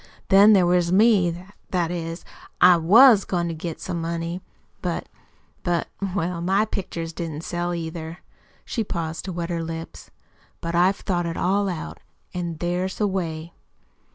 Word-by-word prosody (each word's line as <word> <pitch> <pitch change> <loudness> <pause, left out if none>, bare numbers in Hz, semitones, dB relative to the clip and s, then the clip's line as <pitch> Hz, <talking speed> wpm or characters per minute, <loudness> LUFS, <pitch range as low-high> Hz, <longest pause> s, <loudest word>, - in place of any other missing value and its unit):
"Then 200 +2 +7
there 190 -3 +5
was 175 -1 +2
me 185 -4 +3 0.2
that 175 -2 0
is, 165 -1 -5 0.3
I 180 0 +8
WAS 210 +6 +7
goin' 175 -2 -1
to - - -3
get 160 +1 -6
some 170 - -4
money; 170 +2 -3 0.4
but - - -3 0.5
but, 175 -1 -1 0.3
well 175 -2 -1
MY 195 +4 +2
pictures 170 -5 -5
didn't 160 -2 -5
sell, 175 0 -2
either." 165 0 -6 0.5
She 230 - -2
paused 165 -4 -4
to 190 - -4
wet 170 0 -4
her 170 -1 -1
lips. 165 0 -7 0.5
"But 170 0 -4
I've 180 +3 +4
thought 175 -3 -2
it 165 - -4
all 195 +2 +1
out, 170 -4 -6 0.3
an' 175 -2 -4
there's 180 +3 -2
a 210 - +2
way." 170 -4 -3
175 Hz, 155 wpm, -24 LUFS, 165-185 Hz, 0.5 s, I